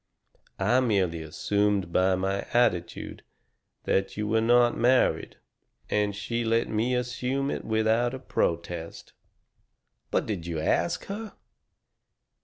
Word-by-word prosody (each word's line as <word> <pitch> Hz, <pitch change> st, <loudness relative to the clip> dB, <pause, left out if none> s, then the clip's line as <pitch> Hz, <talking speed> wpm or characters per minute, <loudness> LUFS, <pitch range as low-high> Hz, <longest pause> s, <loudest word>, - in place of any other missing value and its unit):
I 110 Hz, +6 st, +3 dB
merely 95 Hz, -9 st, +1 dB
assumed 100 Hz, +3 st, 0 dB
by 95 Hz, 0 st, +3 dB
my 95 Hz, +1 st, -2 dB
attitude 100 Hz, -8 st, 0 dB, 0.6 s
that 95 Hz, +1 st, 0 dB
you 105 Hz, 0 st, -2 dB
were 110 Hz, +1 st, +2 dB
not 120 Hz, +1 st, +4 dB
married, 125 Hz, +2 st, +2 dB, 0.5 s
and 105 Hz, -1 st, +1 dB
she 115 Hz, +3 st, -2 dB
let 115 Hz, +1 st, +1 dB
me 115 Hz, +4 st, 0 dB
assume 125 Hz, +3 st, -1 dB
it -, -, -4 dB
without 110 Hz, +3 st, +1 dB
a -, -, -5 dB
protest." 85 Hz, -5 st, -3 dB, 1.0 s
"But -, -, 0 dB
did 90 Hz, -6 st, -4 dB
you 80 Hz, -2 st, -3 dB
ask 85 Hz, +2 st, 0 dB
her?" 210 Hz, +2 st, -6 dB
105 Hz, 120 wpm, -27 LUFS, 95-120 Hz, 1.0 s, not